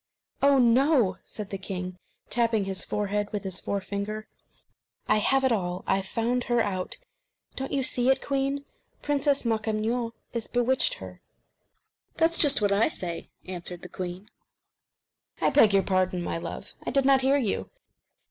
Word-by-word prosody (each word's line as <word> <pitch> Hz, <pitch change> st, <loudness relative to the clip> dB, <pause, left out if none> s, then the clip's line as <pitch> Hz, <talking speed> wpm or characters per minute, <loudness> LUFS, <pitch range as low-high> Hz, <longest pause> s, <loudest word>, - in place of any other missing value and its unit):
"Oh, 280 Hz, 0 st, +5 dB, 0.2 s
ho!" 255 Hz, -, +3 dB
said 210 Hz, -3 st, -7 dB
the 195 Hz, -, -4 dB
king, 185 Hz, -1 st, -5 dB, 0.3 s
tapping 230 Hz, -3 st, +2 dB
his 190 Hz, -1 st, -2 dB
forehead 205 Hz, 0 st, -2 dB
with 210 Hz, -1 st, -3 dB
his 190 Hz, -2 st, -3 dB
forefinger, 200 Hz, +2 st, -4 dB, 0.8 s
"I -, -, +4 dB
have 270 Hz, +5 st, +3 dB
it 260 Hz, -, +3 dB
all. 180 Hz, -4 st, -1 dB
I've 195 Hz, 0 st, 0 dB
found 240 Hz, +4 st, -1 dB
her 240 Hz, -1 st, +1 dB
out. 185 Hz, -4 st, -1 dB, 0.6 s
Don't 270 Hz, 0 st, -4 dB
you 275 Hz, -1 st, +1 dB
see 250 Hz, 0 st, +2 dB
it, 265 Hz, -, +4 dB
queen? 275 Hz, 0 st, -1 dB, 0.4 s
Princess 285 Hz, -2 st, +1 dB
Makemnoit 225 Hz, +1 st, -1 dB, 0.2 s
has 235 Hz, -2 st, -3 dB
bewitched 255 Hz, -, +2 dB
her." -, -, -10 dB, 0.9 s
"That's 330 Hz, +1 st, +3 dB
just 285 Hz, -7 st, +5 dB
what 205 Hz, -, +3 dB
I 205 Hz, +7 st, +3 dB
say," 175 Hz, -, -5 dB, 0.2 s
answered 180 Hz, -1 st, -3 dB
the 180 Hz, -, -6 dB
queen. 185 Hz, +3 st, -6 dB, 1.1 s
"I -, -, +2 dB
beg 225 Hz, -7 st, +6 dB
your 195 Hz, -1 st, +4 dB
pardon, 185 Hz, -1 st, 0 dB
my 165 Hz, -, -3 dB
love; 175 Hz, +3 st, -7 dB
I -, -, -3 dB
did 275 Hz, -1 st, +2 dB
not 270 Hz, -1 st, +5 dB
hear 270 Hz, +2 st, +3 dB
you. 235 Hz, -8 st, -1 dB
215 Hz, 155 wpm, -27 LUFS, 190-265 Hz, 1.1 s, beg